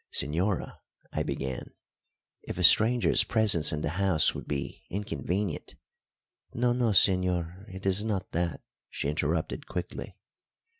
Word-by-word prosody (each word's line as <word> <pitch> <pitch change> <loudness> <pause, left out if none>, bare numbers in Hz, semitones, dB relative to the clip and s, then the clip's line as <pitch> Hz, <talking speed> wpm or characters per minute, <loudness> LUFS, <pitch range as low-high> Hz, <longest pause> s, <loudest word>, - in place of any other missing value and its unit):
"Señora," 90 +7 -2 0.3
I - - -1
began, 65 -2 -5 0.7
"if - - -7
a - - -2
stranger's 115 +2 +5
presence 100 -9 +4
in 75 - -3
the 85 +7 -3
house 95 -5 +6
would - - -8
be 70 -2 -5
inconvenient 100 -2 -4 0.4
" - - -43
"No, 120 +1 +1
no, 120 -1 0
señor, 90 -1 +1
it 95 +1 -10
is 95 +2 +2
not 100 -4 -3
that," 85 -2 -2 0.3
she 70 - -3
interrupted 80 +2 -2
quickly. 90 - -6
90 Hz, 135 wpm, -28 LUFS, 80-105 Hz, 0.7 s, house